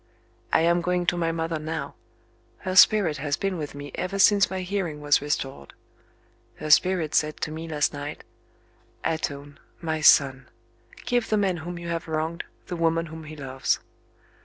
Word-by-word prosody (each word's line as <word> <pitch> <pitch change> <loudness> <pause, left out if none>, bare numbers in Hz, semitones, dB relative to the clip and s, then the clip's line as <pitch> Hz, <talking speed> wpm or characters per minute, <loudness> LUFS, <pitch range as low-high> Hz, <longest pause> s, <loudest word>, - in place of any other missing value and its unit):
I - - +4
am 170 +1 +3
going 180 0 0
to 175 - +2
my 165 -1 0
mother 165 -1 -2
now: 160 +1 -4 0.7
her 185 -1 -3
spirit 190 -6 +6
has 145 0 -1
been 195 -1 -1
with 150 -4 -5
me 145 -1 -8
ever 190 +2 -3
since 200 0 +5
my 190 -1 -3
hearing 180 -5 -3
was 145 -1 +3
restored; 135 - -4 0.8
her 155 0 -4
spirit 175 -1 +4
said 150 0 +1
to 155 - -2
me 160 +1 -6
last 150 -2 0
night: 145 +1 -6 0.8
"Atone, 145 -2 -3 0.2
my 160 -2 -2
son! 135 -3 +5 0.6
Give 245 -2 0
the 215 - +2
man 195 -3 +1
whom 175 +2 -6
you 170 0 -6
have 165 -1 -3
wronged, 160 +2 -2 0.2
the 180 - -5
woman 165 0 +1
whom 160 -1 -9
he 155 0 -9
loves." 135 -2 -1
160 Hz, 170 wpm, -25 LUFS, 150-175 Hz, 0.8 s, spirit